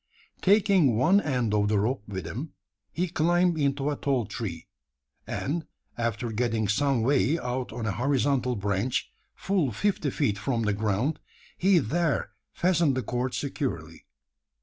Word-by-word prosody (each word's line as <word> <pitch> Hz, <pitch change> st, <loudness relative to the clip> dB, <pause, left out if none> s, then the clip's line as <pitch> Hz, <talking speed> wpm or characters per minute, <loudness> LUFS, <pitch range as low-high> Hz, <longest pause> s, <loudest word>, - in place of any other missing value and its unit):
Taking 190 Hz, -, +4 dB
one 190 Hz, -, +4 dB
end 125 Hz, -, 0 dB
of 105 Hz, -1 st, +2 dB
the 105 Hz, 0 st, +2 dB
rope 120 Hz, +3 st, 0 dB
with 95 Hz, -4 st, -5 dB
him, 125 Hz, -, -6 dB, 0.4 s
he 180 Hz, +2 st, -1 dB
climbed 175 Hz, +1 st, +2 dB
into 140 Hz, 0 st, +1 dB
a -, -, -1 dB
tall 135 Hz, -5 st, 0 dB
tree; 90 Hz, -7 st, -5 dB, 0.6 s
and, 160 Hz, +3 st, -3 dB, 0.3 s
after 115 Hz, 0 st, -2 dB
getting 110 Hz, -1 st, 0 dB
some 135 Hz, +2 st, +1 dB
way 140 Hz, +4 st, +3 dB
out 125 Hz, -3 st, -3 dB
on 115 Hz, 0 st, -5 dB
a 105 Hz, -, 0 dB
horizontal 125 Hz, +1 st, +1 dB
branch 100 Hz, +4 st, -1 dB, 0.2 s
full 185 Hz, -9 st, 0 dB
fifty 160 Hz, -, 0 dB
feet 110 Hz, -8 st, 0 dB
from 115 Hz, +2 st, -1 dB
the 105 Hz, -1 st, +1 dB
ground 110 Hz, +8 st, 0 dB, 0.4 s
he 190 Hz, 0 st, +4 dB
there 155 Hz, -1 st, 0 dB, 0.2 s
fastened 170 Hz, -6 st, +2 dB
the 130 Hz, -, -1 dB
cord 125 Hz, +3 st, -2 dB
securely. 85 Hz, -, -4 dB
130 Hz, 150 wpm, -27 LUFS, 110-150 Hz, 0.6 s, Taking